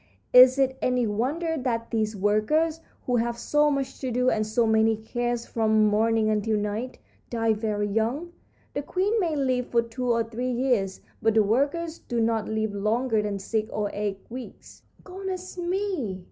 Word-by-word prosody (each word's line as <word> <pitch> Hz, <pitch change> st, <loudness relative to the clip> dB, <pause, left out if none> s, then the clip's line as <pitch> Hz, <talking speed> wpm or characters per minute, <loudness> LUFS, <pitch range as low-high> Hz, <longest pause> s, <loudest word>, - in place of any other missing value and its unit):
Is 255 Hz, +1 st, +9 dB
it 265 Hz, -1 st, +1 dB
any 250 Hz, -1 st, +1 dB
wonder 285 Hz, +11 st, -1 dB
that 230 Hz, -3 st, -2 dB
these 220 Hz, -2 st, 0 dB
workers, 215 Hz, +12 st, +1 dB, 0.3 s
who 250 Hz, -1 st, +1 dB
have 235 Hz, 0 st, -1 dB
so 295 Hz, +5 st, +2 dB
much 275 Hz, -2 st, -2 dB
to 260 Hz, -, -3 dB
do 250 Hz, +1 st, +2 dB
and 215 Hz, -1 st, 0 dB
so 230 Hz, +2 st, +2 dB
many 220 Hz, 0 st, +3 dB
cares 240 Hz, +2 st, -3 dB
from 220 Hz, -1 st, +2 dB
morning 220 Hz, +1 st, +2 dB
until 215 Hz, 0 st, +1 dB
night, 210 Hz, +5 st, -3 dB, 0.3 s
die 225 Hz, -2 st, +1 dB
very 210 Hz, -1 st, -1 dB
young? 230 Hz, +11 st, -1 dB, 0.4 s
The 285 Hz, -, -2 dB
queen 390 Hz, +9 st, 0 dB
may 335 Hz, -6 st, 0 dB
live 255 Hz, -3 st, 0 dB
for 235 Hz, -1 st, +2 dB
two 245 Hz, +2 st, -2 dB
or 230 Hz, 0 st, +2 dB
three 235 Hz, +3 st, -4 dB
years, 240 Hz, -6 st, 0 dB, 0.2 s
but 225 Hz, -1 st, +2 dB
the 220 Hz, -, +5 dB
workers 285 Hz, +10 st, 0 dB
do 240 Hz, -, -3 dB
not 225 Hz, -1 st, 0 dB
live 220 Hz, -1 st, -1 dB
longer 220 Hz, +3 st, +1 dB
than 205 Hz, -1 st, -2 dB
six 215 Hz, +3 st, -2 dB
or 210 Hz, -3 st, -2 dB
eight 205 Hz, -1 st, -3 dB
weeks." 250 Hz, +1 st, -10 dB, 0.2 s
"Goodness 370 Hz, -1 st, -6 dB
me!" 350 Hz, -, -2 dB
235 Hz, 175 wpm, -26 LUFS, 215-265 Hz, 0.4 s, Is